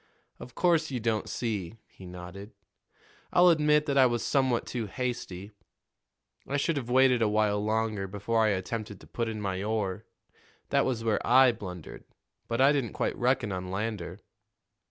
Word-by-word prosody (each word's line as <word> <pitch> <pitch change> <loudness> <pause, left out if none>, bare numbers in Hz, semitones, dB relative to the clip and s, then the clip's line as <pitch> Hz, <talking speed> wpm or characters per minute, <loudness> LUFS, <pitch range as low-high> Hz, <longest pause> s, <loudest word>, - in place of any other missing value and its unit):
"Of 125 - -11
course, 165 -3 +2
you 130 -3 -3
don't 110 -1 -1
see," 110 -4 -3
he 95 - -14
nodded. 90 +4 -9 0.8
"I'll 180 0 +6
admit 150 -2 +3
that 140 -2 +1
I 130 - +7
was 120 -1 -1
somewhat 130 -4 +1
too 115 -4 -4
hasty. 105 -5 -4 1.0
I 140 - -1
should 155 +3 0
have 125 -4 -4
waited 130 -1 +4
a 110 - +3
while 105 -1 +1
longer 110 -2 -1
before 105 +4 0
I - - +3
attempted 105 +1 -3
to - - -13
put 115 -1 -3
in 110 -1 -5
my 95 -2 -3
oar. 105 -1 -2 0.6
That - - +2
was 120 -3 -2
where 110 -2 +1
I 130 0 +6
blundered; 90 -7 -9 0.4
but 115 +1 -2
I 135 +2 +6
didn't 135 -7 -1
quite - - -1
reckon 125 -3 +1
on 90 -1 -4
Lander." 100 -1 -4
115 Hz, 170 wpm, -28 LUFS, 100-130 Hz, 1.0 s, I